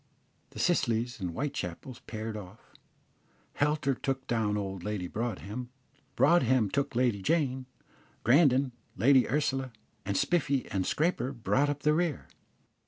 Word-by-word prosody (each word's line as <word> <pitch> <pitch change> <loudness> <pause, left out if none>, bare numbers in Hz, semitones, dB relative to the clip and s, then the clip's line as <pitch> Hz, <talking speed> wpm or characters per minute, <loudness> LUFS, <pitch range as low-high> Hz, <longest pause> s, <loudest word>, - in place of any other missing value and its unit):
The - - -14
Scillys 120 -8 +1
and 90 -3 -2
Whitechapels 125 - -4
paired 110 0 -5
off; 105 +1 -11 0.8
Helter 145 -1 +1
took 130 +1 -3
down 110 -3 0
old 95 -3 -4
Lady 105 -3 -3
Broadhem; 115 +2 -4 0.5
Broadhem 130 - +4
took 140 -2 -1
Lady 120 -5 +1
Jane; 130 - 0 0.6
Grandon, 135 0 +4 0.3
Lady 130 0 +5
Ursula; 135 -2 0 0.3
and 100 -1 -1
Spiffy 140 -6 +1
and 95 -2 -1
Scraper 150 -5 0
brought 130 +4 +1
up 145 0 -3
the 150 - +4
rear. 165 -3 0
125 Hz, 125 wpm, -30 LUFS, 110-140 Hz, 0.8 s, Lady